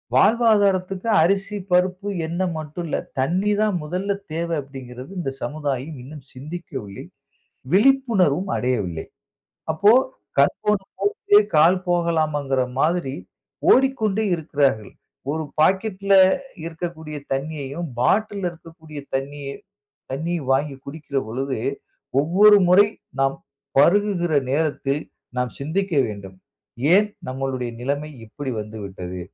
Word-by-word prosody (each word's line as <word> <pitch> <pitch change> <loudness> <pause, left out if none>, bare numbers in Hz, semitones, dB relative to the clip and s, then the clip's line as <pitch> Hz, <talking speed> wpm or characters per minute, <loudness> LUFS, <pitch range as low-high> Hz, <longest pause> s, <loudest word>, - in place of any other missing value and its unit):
வாழ்வாதாரத்துக்கு 200 - +3 0.2
அரிசி, 200 +3 0
பருப்பு, 185 +2 +2 0.2
எண்ண 170 +3 -3 0.2
மட்டும் 155 +3 -5
இல்ல, - - -1 0.2
தண்ணீ 185 +10 +1
தான் 210 -4 +2
முதல்ல 185 +6 -2 0.2
தேவை," 170 0 -1
அப்படிங்கிறது 130 +1 -10
இந்த 135 -6 -2
சமுதாயம் 145 -1 -3
இன்னும் 140 0 -11
சிந்திக்கவில்லை, 135 - -7 0.7
விழிப்புணர்வும் 200 - +3
அடையவில்லை. 100 -10 -1 0.7
அப்போ 200 +6 +5 0.5
கண் - - +4
போன 210 0 +4 0.3
போக்கிலே 415 -1 +4 0.2
கால் 175 +4 +5
போகலாமாங்கிற 155 -6 +1 0.2
மாதிரி, 165 -4 +1 0.6
ஓடிக்கொண்டே 220 -6 +3
இருக்கிறார்கள். 140 - 0 0.4
ஒரு 160 +1 -2 0.2
பாக்கெட்ல 195 +2 +2 0.5
இருக்கக்கூடிய 160 -2 -6 0.2
தண்ணீயையும் 145 +3 -3
பாட்டில்ல 200 - +1
இருக்கக்கூடிய 160 -2 -11
தண்ணீய, 140 +1 -3 0.6
தண்ணீ 165 +6 -2 0.2
வாங்கிக் 135 0 0
குடிக்கிற 140 -1 -4
பொழுது, 130 +4 -3 0.7
ஒவ்வொரு 205 +5 +6
முறை 200 +3 +7 0.3
நாம் 135 0 +2 0.4
பருகுகிற 175 0 +3 0.2
நேரத்தில், 145 -1 0 0.3
நாம் 125 -1 0
சிந்திக்க 175 +7 -2
வேண்டும். 100 -3 -8 0.6
"ஏன் 210 +2 +5 0.2
நம்மளுடைய 130 -2 -3
நிலமை 145 +4 -2 0.2
இப்படி 130 +4 -5
வந்துவிட்டது? 95 -4 -7
160 Hz, 100 wpm, -22 LUFS, 135-190 Hz, 0.7 s, முறை